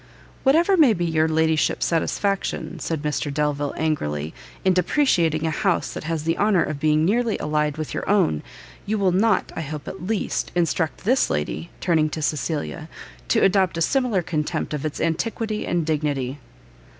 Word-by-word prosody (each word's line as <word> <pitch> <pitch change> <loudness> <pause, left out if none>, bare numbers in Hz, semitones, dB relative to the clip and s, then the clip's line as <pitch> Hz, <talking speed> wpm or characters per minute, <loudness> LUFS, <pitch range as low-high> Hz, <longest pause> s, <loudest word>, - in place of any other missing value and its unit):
"Whatever 335 +8 +4
may 285 -9 +6
be 175 -3 -1
your 160 -1 +2
ladyship's 160 0 +1
satisfaction," 185 +1 -1
said 155 -1 -3
Mr 150 -1 -1
Delvile, 145 -1 -1
angrily, 80 - -1 0.3
"in 190 - +5
depreciating 175 - +2
a 160 - 0
house - - 0
that - - -6
has 160 -1 -2
the 165 +1 -1
honour 205 -4 +3
of 150 -2 -4
being 155 +1 +3
nearly 225 +3 +1
allied 150 -1 0
with 155 -1 -4
your - - -4
own, 190 - +2 0.5
you 215 +1 0
will 195 -3 +2
not, 200 +2 +2
I - - -3
hope 150 -1 -6
at 180 - -6
least, 220 -2 -1
instruct 165 -2 0
this 255 +6 +2
lady," 75 +2 -2
turning 160 -3 +2
to 155 - -5
Cecilia, 155 +2 -2 0.4
"to 225 - +2
adopt 190 -3 +3
a - - -2
similar 245 -5 +1
contempt 155 -1 -2
of 150 +1 -2
its 150 - -6
antiquity 215 +6 -2
and 175 -2 0
dignity." 145 -3 -1
160 Hz, 170 wpm, -23 LUFS, 150-195 Hz, 0.5 s, may